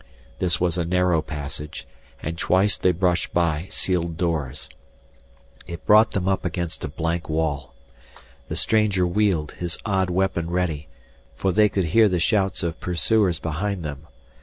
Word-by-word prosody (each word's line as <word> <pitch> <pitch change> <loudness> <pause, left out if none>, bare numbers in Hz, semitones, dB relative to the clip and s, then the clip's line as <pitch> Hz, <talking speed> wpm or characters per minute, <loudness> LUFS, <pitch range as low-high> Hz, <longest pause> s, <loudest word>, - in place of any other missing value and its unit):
This 90 -2 +2
was 90 0 +1
a - - +1
narrow 90 -1 +2
passage, 75 -1 -7 0.4
and 80 +2 -3
twice 95 +4 +2
they 90 - +2
brushed 90 0 0
by 85 0 +1
sealed 85 -3 -1
doors. 80 -7 -2 1.0
It 85 -1 -8
brought 110 +1 +6
them 95 -1 -1
up 95 -1 +1
against 85 -2 -3
a - - -1
blank 85 +3 -3
wall. 75 -3 -2 0.7
The - - -4
stranger 105 -4 +2
wheeled, 90 -4 +1
his 85 -1 -4
odd 95 -3 +1
weapon 90 -2 0
ready, 85 -5 -1 0.5
for 95 +8 0
they 105 +3 +4
could 95 -2 0
hear 110 +6 +4
the 90 -2 0
shouts 95 +1 +1
of 85 -1 -3
pursuers 90 +1 +1
behind 90 +4 -3
them. 75 +1 -7
90 Hz, 155 wpm, -23 LUFS, 80-95 Hz, 1.0 s, brought